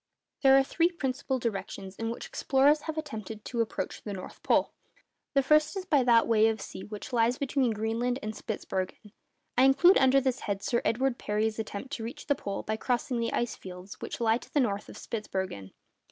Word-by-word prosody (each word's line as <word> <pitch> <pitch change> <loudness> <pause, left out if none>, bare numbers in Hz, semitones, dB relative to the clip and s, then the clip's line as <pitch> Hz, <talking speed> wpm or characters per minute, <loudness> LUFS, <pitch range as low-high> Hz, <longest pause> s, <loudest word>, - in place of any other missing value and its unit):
There 270 -1 +7
are 270 - +5
three 335 +5 +2
principal 265 -5 -2
directions 200 -4 -4
in 225 +2 -3
which 235 - -5
explorers 285 +3 +3
have 315 -1 -5
attempted 220 -8 -6
to 235 -2 -1
approach 225 - -3
the 205 - -5
North 185 -1 -8
Pole. - - +2 0.6
The 275 - +4
first 305 +6 +3
is 375 - -4
that 290 -8 +3
by 230 -1 +6
way 220 -1 +4
of 220 -1 +1
the - - -8
sea - - -8
which 210 +4 -8
lies 235 +1 +3
between 275 -2 +1
Greenland 225 +3 -1
and 215 +1 -3
Spitzbergen. 200 -1 -4 0.5
I - - +7
include 275 +8 +6
under 265 0 +5
this 260 -1 0
head 200 -2 -3
Sir 235 - +1
Edward 255 +2 +1
Parry's 215 +1 -1
attempt 220 +4 -5
to 225 - -4
reach 235 +5 -7
the 285 - +3
pole 200 -7 -5
by 220 0 -2
crossing 245 +2 -1
the 230 - -1
ice 240 -1 -1
fields 185 +1 -10
which - - -5
lie 230 0 +3
to - - -15
the 295 - +2
north 210 -5 0
of - - -10
Spitzbergen. 190 - -4
235 Hz, 205 wpm, -29 LUFS, 215-270 Hz, 0.6 s, There